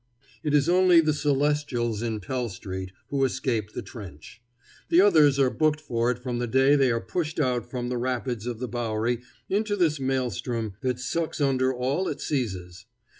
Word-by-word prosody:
It 150 -2 0
is 145 +1 +3
only 180 -1 +6
the 155 -2 +3
Celestials 145 -6 0
in 110 -2 -2
Pell 125 +4 -2
street 95 -1 -6 0.2
who 140 -1 0
escape 120 -5 -1
the - - -5
trench. 100 - -11 0.5
The 170 - +5
others 155 -8 +6
are 135 -2 +3
booked 155 -1 +1
for 120 -6 -1
it 125 - 0
from 125 -1 -4
the 120 - -1
day 135 +4 +4
they 135 -3 +4
are 115 - +1
pushed 160 +4 -3
out 125 -5 0
from 125 -1 -3
the 125 -1 -2
rapids 125 -2 -2
of 120 -2 -3
the 125 +2 -4
Bowery 120 0 -1 0.3
into 205 +1 0
this 160 -6 +1
maelstrom 125 -4 -2
that 130 -2 -1
sucks 160 +7 -2
under 130 -2 +2
all 130 +8 -1
it - - -3
seizes. 95 - -3
130 Hz, 180 wpm, -26 LUFS, 120-145 Hz, 0.5 s, only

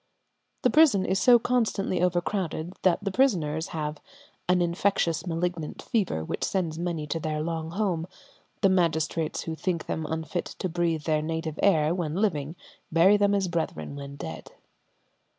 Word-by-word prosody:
The - - +4
prison 265 -12 +5
is 190 +1 +1
so 240 +4 +7
constantly 225 -6 0
overcrowded 180 -1 -1
that 185 +1 +2
the 195 - -1
prisoners 165 - +1
have 150 -1 -4 0.5
"an 180 0 +4
infectious 175 -1 +1
malignant 165 -1 -2
fever 185 - -1
which - - -3
sends 170 -4 -1
many 170 -3 -2
to 165 +2 -2
their 155 -1 -2
long 160 -1 -3
home. 175 -3 -1 0.5
The 195 - +5
magistrates 165 -3 +1
who 165 - -4
think 170 0 -2
them 160 -1 -3
unfit 160 +3 -4
to - - -2
breathe 165 -2 -1
their 155 -1 +1
native 160 0 -3
air 160 -5 +4
when 165 -4 -2
living 165 -7 0 0.4
bury 170 +5 +6
them 205 0 +3
as 195 -2 +1
brethren 160 - -3
when 140 0 -7
dead." - - -7
170 Hz, 155 wpm, -27 LUFS, 160-190 Hz, 0.5 s, so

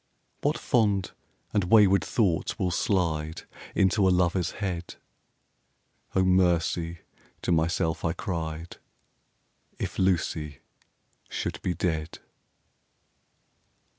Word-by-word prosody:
What - - +1
fond 100 -6 +1 0.4
and 100 -3 +2
wayward 100 -1 +5
thoughts 95 -9 0
will 90 - 0
slide 80 -4 0 0.3
Into 95 +1 +3
a - - +5
Lover's 90 -1 +1
head! 90 -4 -4 1.2
"O 95 - +4
mercy!" 85 -2 +2 0.4
to - - 0
myself 80 0 +1
I 80 - +1
cried, 85 -2 -4 1.0
"If - - -4
Lucy 80 -5 0 0.7
should - - -4
be 90 - -1
dead!" 80 -3 -2
90 Hz, 95 wpm, -27 LUFS, 80-95 Hz, 1.2 s, wayward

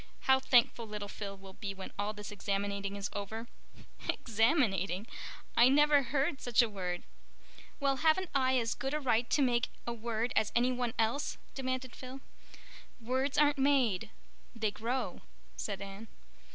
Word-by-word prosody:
How 265 0 +5
thankful 240 -3 +3
little 210 -1 -5
Phil 200 -1 -6
will 190 0 -12
be 195 0 -5
when 190 0 -7
all 205 +1 0
this 210 -1 -8
examinating 200 0 -2
is 200 0 -4
over." 220 +3 -4 0.6
"Examinating? 215 - +2 0.5
I 240 +2 +7
never 295 +1 +5
heard 270 +2 0
such 245 0 +4
a - - +1
word." 180 -3 -4 0.8
"Well, 275 -2 +2
haven't 320 +5 +2
I 260 -1 +3
as 230 -2 +1
good 270 +2 -3
a - - 0
right 240 -4 +1
to 290 - +3
make 240 -2 +2 0.2
a 235 - -2
word 230 +1 -2
as 215 -1 +2
any 245 +2 +4
one 245 -2 -2
else?" 230 +6 0 0.2
demanded 255 -1 -3
Phil. 260 +1 -8 0.8
"Words 260 +4 -1
aren't 295 -1 +4
made—they 225 -4 0
grow," 230 -2 -3 0.3
said 200 -2 -4
Anne. 200 +3 -9
235 Hz, 150 wpm, -32 LUFS, 205-265 Hz, 0.8 s, I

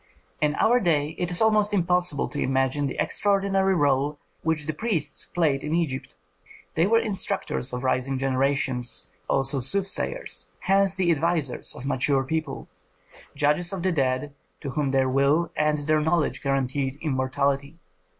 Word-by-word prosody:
In 150 0 +2
our 245 +2 +3
day 155 -8 +1
it 175 - -1
is 175 +4 +3
almost 210 -1 +3
impossible 180 -4 +1
to 145 - -5
imagine 135 +2 +1
the - - -5
extraordinary 195 -1 +2
rôle 145 -1 +1 0.2
which 160 -2 -1
the 155 - -2
priests 170 -4 -1
played 150 -6 0
in 150 +2 -1
Egypt. 150 -6 -2 0.6
They 165 +3 +2
were 230 +2 +4
instructors 195 - -1
of 125 +1 -4
rising 130 +1 0
generations, 130 -2 0 0.2
also 135 +1 +2
soothsayers, 195 - -1
hence 195 0 +2
the 185 -3 +2
advisers 160 -4 -1
of 125 - -8
mature 135 0 +1
people, 155 +1 -4 0.7
judges 150 +5 +1
of 190 -3 -4
the 185 - +2
dead, 135 -2 -1 0.3
to 140 - -4
whom 145 +1 -1
their 135 -1 +2
will 140 +6 +2
and 150 0 +1
their 155 0 +2
knowledge 160 -1 0
guaranteed 135 0 -1
immortality. 140 +1 -1
150 Hz, 150 wpm, -25 LUFS, 135-175 Hz, 0.7 s, were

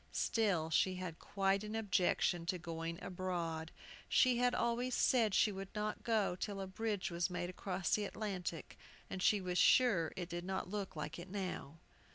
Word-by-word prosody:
Still 185 -8 +1
she 185 +3 +3
had 180 -3 -5
quite 195 0 +1
an 215 +1 -5
objection 185 -5 +1
to 180 - 0
going 165 -1 -4
abroad. 170 -3 -3 0.4
She 250 -2 +4
had 245 0 +3
always 240 +2 0
said 225 -6 +3
she 215 - +4
would 195 0 -6
not 210 0 -2
go 215 -6 +1
till 195 +2 -4
a 195 - -3
bridge 205 0 -2
was 170 +2 0
made 175 0 -3
across 185 -1 -2
the 210 - +2
Atlantic, 195 -5 -4 0.3
and 190 - -4
she 205 +2 +4
was 180 -1 -1
sure 200 -11 +5
it 175 -2 -4
did 175 0 -4
not 190 +1 -3
look 205 -4 -3
like 155 +2 -5
it 175 +2 -8
now. 185 -6 -4
190 Hz, 180 wpm, -36 LUFS, 175-210 Hz, 0.4 s, sure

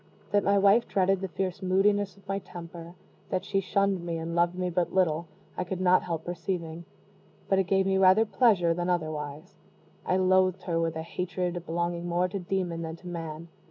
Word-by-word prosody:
That 205 -1 +3
my 200 0 +3
wife 200 +4 +4
dreaded 195 0 +2
the 190 - -2
fierce 190 +1 -3
moodiness 200 +2 +2
of 200 0 -21
my 195 0 -1
temper 170 -1 -10 0.3
that 185 0 -2
she 195 -1 0
shunned 195 -1 0
me, 170 -1 -3
and 165 +1 -4
loved 175 +1 +2
me 180 -1 -2
but 175 0 0
little 170 -3 +1 0.3
I - - -2
could 180 0 -4
not 185 0 +4
help 165 -2 -4
perceiving; 170 -1 -4 0.6
but 195 - +3
it 190 - +2
gave 190 +1 +2
me 190 0 +2
rather 190 +4 +6
pleasure 205 -8 +3
than 175 +1 -2
otherwise. 155 -3 -3 0.5
I 185 - +1
loathed 185 0 +3
her 170 -2 -1
with 165 -1 -1
a 160 - -4
hatred 180 0 -3
belonging 170 +1 -2
more 175 +1 +1
to 200 - -4
demon 180 -2 -2
than 160 -1 -5
to 180 - -13
man. 165 -1 -6
180 Hz, 195 wpm, -28 LUFS, 170-190 Hz, 0.6 s, rather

